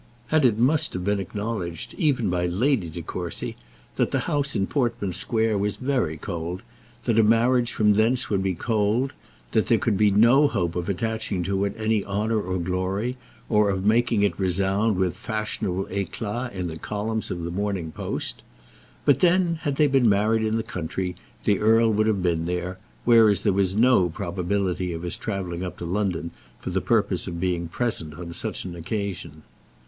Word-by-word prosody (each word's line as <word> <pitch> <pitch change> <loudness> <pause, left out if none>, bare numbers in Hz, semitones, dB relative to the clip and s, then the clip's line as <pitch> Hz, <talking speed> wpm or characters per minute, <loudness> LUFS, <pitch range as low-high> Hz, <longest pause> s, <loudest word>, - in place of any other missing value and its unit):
And 155 -1 +4
it 115 -4 +4
must 150 +6 +2
have 90 - -3
been 100 0 +1
acknowledged, 95 -3 -4
even 135 -9 +1
by 90 0 0
Lady 105 - +1
De 85 +1 -7
Courcy, 90 0 -5 0.4
that - - +2
the - - 0
house 140 -2 -1
in 95 - +1
Portman 120 -7 -1
Square 110 +3 0
was 100 0 -1
very 125 - -1
cold 85 +1 -5 0.4
that 115 -2 +2
a - - +6
marriage 120 +2 +3
from 105 -1 +3
thence 115 +3 +2
would 100 -3 0
be 95 -1 0
cold, 110 +6 0 0.4
that - - +2
there - - +4
could 100 - 0
be 105 0 +4
no 120 +8 +5
hope 90 -9 -1
of 90 +1 -2
attaching 110 -2 -1
to 95 +1 0
it 100 - -3
any 110 -2 +1
honour 105 -1 -1
and 90 -2 -1
glory, 95 +7 -1 0.3
or 105 -2 +3
of 95 -1 -1
making 115 -1 +3
it 100 - 0
resound 95 +3 +1
with 90 -2 0
fashionable 110 -4 -2
éclat 105 +5 -3
in 90 -2 -3
the 80 -1 -6
columns 110 +3 -3
of 85 -1 -4
the 85 - -3
Morning 95 -3 -2
Post. - - -4 0.6
But 145 - +4
then, 175 -2 +3
had 145 -5 -1
they 150 - +4
been 135 -5 +4
married 105 +2 +2
in 110 0 0
the 115 - -1
country, 90 -2 -4 0.3
the 100 -2 +2
earl 110 +1 +4
would 110 +1 +2
have 100 -4 +1
been 85 -2 +1
there; 90 +1 -3 0.3
whereas 115 -4 +6
there 100 - +2
was 95 -1 +1
no 115 -5 +4
probability 90 0 -2
of 85 +1 -6
his 90 - -2
travelling 95 -4 -4
up 90 - -5
to 85 - -6
London 90 -2 -1 0.3
for - - -6
the - - 0
purpose - - +1
of 85 -1 -4
being 85 -2 -1
present 85 - -2
on 85 0 -7
such - - -2
an 90 -2 -6
occasion. 85 -4 -5
100 Hz, 185 wpm, -25 LUFS, 90-115 Hz, 0.6 s, a